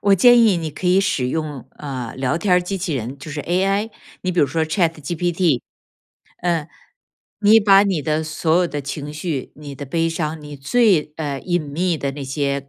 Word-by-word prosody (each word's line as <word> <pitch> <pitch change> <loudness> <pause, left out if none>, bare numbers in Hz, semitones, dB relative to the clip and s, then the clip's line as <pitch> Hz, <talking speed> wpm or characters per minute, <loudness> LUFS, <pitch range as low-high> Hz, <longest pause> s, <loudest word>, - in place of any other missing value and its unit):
我 200 0 +4
建 240 +5 +6
议 215 -6 +5
你 160 -2 -3
可 180 +5 -5
以 185 +2 +5
使 130 -10 0
用， 145 -4 -4
呃， 130 -5 -6
聊 130 +4 0
天 195 +3 -2
儿 180 - +4
机 195 +2 -3
器 170 -5 -2
人， 125 +2 -4
就 155 +2 -9
是 145 0 -4
AI， 195 +5 0 0.3
你 185 0 -1
比 175 - +2
如 145 - +4
说 160 +4 0
ChatGPT， 165 - 0 0.8
嗯。 170 -3 0 0.8
你 220 +2 +8
把 200 -1 +6
你 190 -6 0
的 155 +2 0
所 160 +1 0
有 175 -2 +2
的 145 - -4
情 145 +1 -6
绪， 155 -3 -4
你 145 -2 -9
的 145 - -7
悲 165 +4 0
伤， 160 -1 -3
你 145 -1 -9
最， 160 - +2
呃， 145 -4 -3
隐 175 -1 0
秘 160 +3 -1
的 140 -1 -2
那 140 0 -7
些， 140 0 -2
160 Hz, 245 characters per minute, -20 LUFS, 145-180 Hz, 0.8 s, 你